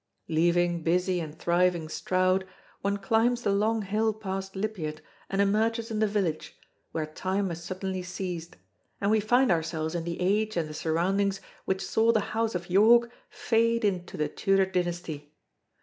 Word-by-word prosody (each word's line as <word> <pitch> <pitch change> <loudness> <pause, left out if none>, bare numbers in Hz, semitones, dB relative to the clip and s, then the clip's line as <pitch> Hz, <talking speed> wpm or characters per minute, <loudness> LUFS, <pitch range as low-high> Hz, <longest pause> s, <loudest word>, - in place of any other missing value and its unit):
Leaving 170 +1 +2
busy 180 +2 +1
and 160 -2 -6
thriving 175 -1 +1
Stroud, 185 +3 +1 0.3
one 200 +1 0
climbs 230 +4 +1
the 200 - +2
long 215 +2 +1
hill 215 +2 0
past 195 -2 -5
Lipiat 190 -7 -3 0.3
and 195 - -2
emerges 225 +3 +1
in 215 - -1
the 215 - +3
village, 195 -7 -2 0.3
where 160 -1 -2
time 190 +5 -2
has 170 0 -6
suddenly 185 0 -4
ceased, 180 -2 -5 0.4
and 200 +1 +1
we 220 - +4
find 245 +4 +3
ourselves 160 -1 -1
in 170 -1 -2
the 170 0 -4
age 210 +3 +1
and 165 -2 0
the 155 - -8
surroundings 190 +6 0 0.3
which 190 0 -1
saw 225 +1 +3
the 220 -3 0
House 225 -2 0
of 175 0 -3
York 230 +5 +5 0.2
fade 230 0 +1
into 185 -3 -2
the 150 - 0
Tudor 195 +4 +2
dynasty. 175 -5 -3
190 Hz, 165 wpm, -28 LUFS, 170-215 Hz, 0.4 s, York